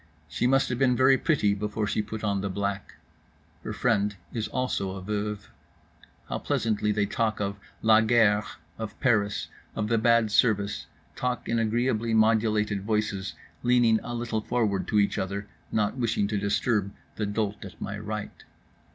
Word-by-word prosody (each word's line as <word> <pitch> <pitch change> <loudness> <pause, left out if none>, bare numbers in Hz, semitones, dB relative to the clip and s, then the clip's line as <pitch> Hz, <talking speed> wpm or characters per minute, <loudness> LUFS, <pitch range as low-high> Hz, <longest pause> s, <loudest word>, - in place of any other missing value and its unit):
She 80 +11 0
must 135 +1 +3
have 125 -1 -2
been 125 -2 +4
very 130 +2 +5
pretty 130 -8 +2
before 105 +1 -2
she 105 +1 0
put 110 +1 -6
on 100 -2 0
the 100 - -2
black. 100 +1 -3 0.7
Her - - -4
friend 105 -4 +1 0.2
is 110 -2 -2
also 105 -6 -2
a 95 - -6
veuve. 105 0 -3 0.8
How - - -3
pleasantly 105 -1 0
they 105 -1 +1
talk, 110 +1 -1
of 100 0 -2 0.2
la 110 0 +6
guerre, 110 -2 +4 0.4
of 110 -1 -6
Paris, 105 -5 +1 0.3
of 105 0 -2
the 115 -1 +3
bad 115 -1 +3
service; 105 -3 +2 0.3
talk 125 -1 -2
in 115 - +1
agreeably 115 0 +1
modulated 110 -2 +2
voices, 105 -2 -1 0.3
leaning 120 -2 +4
a 120 - -5
little 115 -2 -2
forward 110 -4 0
to 105 - +1
each 100 - +1
other, 100 +2 -3 0.3
not 105 +3 0
wishing 115 -4 +1
to 105 - 0
disturb 100 0 0 0.3
the 105 - -1
dolt 105 0 -2
at 95 -3 -10
my 100 - -4
right. 105 0 -6
105 Hz, 165 wpm, -27 LUFS, 100-115 Hz, 0.8 s, la